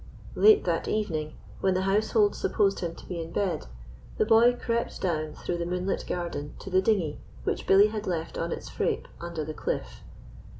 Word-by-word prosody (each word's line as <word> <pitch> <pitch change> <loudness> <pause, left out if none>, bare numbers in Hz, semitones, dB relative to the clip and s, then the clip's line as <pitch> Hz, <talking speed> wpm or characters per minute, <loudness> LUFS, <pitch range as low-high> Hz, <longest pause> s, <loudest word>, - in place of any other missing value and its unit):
Late 430 0 +6
that - - -1
evening, 160 -8 -1 0.3
when 190 -1 +2
the 185 - +1
household 210 +1 +2
supposed 195 -2 +1
him 170 -2 -3
to - - -13
be 175 -2 -4
in 165 0 -7
bed, 185 - -1 0.5
the - - +3
boy 230 +2 +6
crept 235 -1 -2
down 155 -4 -1
through 175 - -3
the 170 - -1
moonlit 180 +2 -2
garden 170 -5 -4
to 195 - -9
the 185 +1 +4
dinghy 190 -8 +1 0.2
which - - -2
Billy 200 +2 +7
had 215 -1 -5
left 170 -3 -2
on 165 0 -2
its - - -5
frape - - -1 0.2
under 170 -3 -4
the 155 - -5
cliff. - - -4
185 Hz, 185 wpm, -27 LUFS, 165-210 Hz, 0.5 s, Billy